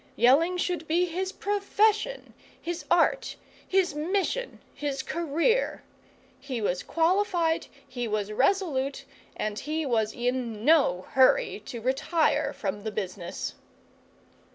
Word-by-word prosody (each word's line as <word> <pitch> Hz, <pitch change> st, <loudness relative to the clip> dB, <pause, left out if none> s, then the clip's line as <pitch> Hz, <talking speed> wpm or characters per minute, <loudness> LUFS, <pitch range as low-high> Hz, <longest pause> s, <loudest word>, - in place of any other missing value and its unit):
Yelling 300 Hz, +10 st, +4 dB
should 355 Hz, -2 st, -2 dB
be 345 Hz, +3 st, +2 dB
his 370 Hz, +2 st, -3 dB
profession, 415 Hz, +4 st, 0 dB, 0.3 s
his 345 Hz, 0 st, -5 dB
art, 350 Hz, +8 st, +2 dB, 0.3 s
his 375 Hz, -4 st, +2 dB
mission, 380 Hz, +10 st, -1 dB
his 275 Hz, -2 st, -3 dB
career. 335 Hz, -, 0 dB, 0.6 s
He 255 Hz, -4 st, -4 dB
was 185 Hz, -4 st, -1 dB
qualified, 335 Hz, -1 st, +1 dB, 0.2 s
he 245 Hz, -3 st, -4 dB
was 210 Hz, -1 st, -2 dB
resolute, 275 Hz, -, 0 dB, 0.3 s
and 215 Hz, 0 st, -2 dB
he 310 Hz, +2 st, -2 dB
was 220 Hz, -4 st, +1 dB
in 240 Hz, -3 st, -2 dB
no 270 Hz, -, +4 dB
hurry 460 Hz, -, +3 dB
to 240 Hz, -4 st, -6 dB
retire 280 Hz, +7 st, +1 dB
from 205 Hz, 0 st, -4 dB
the 220 Hz, -, -3 dB
business. 185 Hz, -4 st, -4 dB
305 Hz, 115 wpm, -27 LUFS, 240-360 Hz, 0.6 s, Yelling